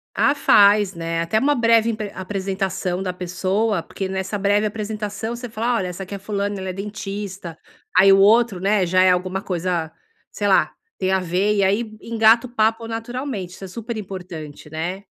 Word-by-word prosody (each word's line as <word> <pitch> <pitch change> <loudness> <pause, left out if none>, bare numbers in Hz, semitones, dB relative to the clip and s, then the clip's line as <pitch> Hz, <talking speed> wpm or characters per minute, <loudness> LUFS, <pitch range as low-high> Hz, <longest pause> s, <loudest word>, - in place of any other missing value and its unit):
Ah, - - +3
faz, 205 -7 +5
né. 165 0 -2
Até 170 +6 +1
uma 290 +5 +3
breve 230 -2 +4
impr 215 -3 -3
apresentação 190 -1 -3
da 185 -1 -3
pessoa, 185 +2 -1
porque 195 - -5
nessa 190 +2 -3
breve 205 +1 +2
apresentação, 215 +1 -4
você 245 0 -7
fala: 230 +2 -1
"Olha, 185 - -2
essa 180 +2 -6
aqui 190 - -9
é - - -5
a - - -13
fulana, 200 0 -3
ela 190 0 -4
é - - -3
dentista". 195 -3 -6 0.4
Aí 195 +1 +7
o 195 - +5
outro, 215 0 +4
né, 195 0 +2
já 185 +1 +3
é 185 - +6
alguma 185 +1 -1
coisa, 180 -3 -2
ah 160 - -15 0.4
sei - - -2
lá, - - +3 0.3
tem 190 0 0
a 190 - +3
ver, 185 +4 0
e 200 - +2
aí 215 +3 0
engata 230 +1 +4
o - - -18
papo 225 -1 0
naturalmente, 230 -3 -4
isso - - -12
é - - -5
super 225 +4 -6
importante, 180 -7 -8
né? 175 +5 -4
200 Hz, 200 wpm, -21 LUFS, 185-220 Hz, 0.4 s, Aí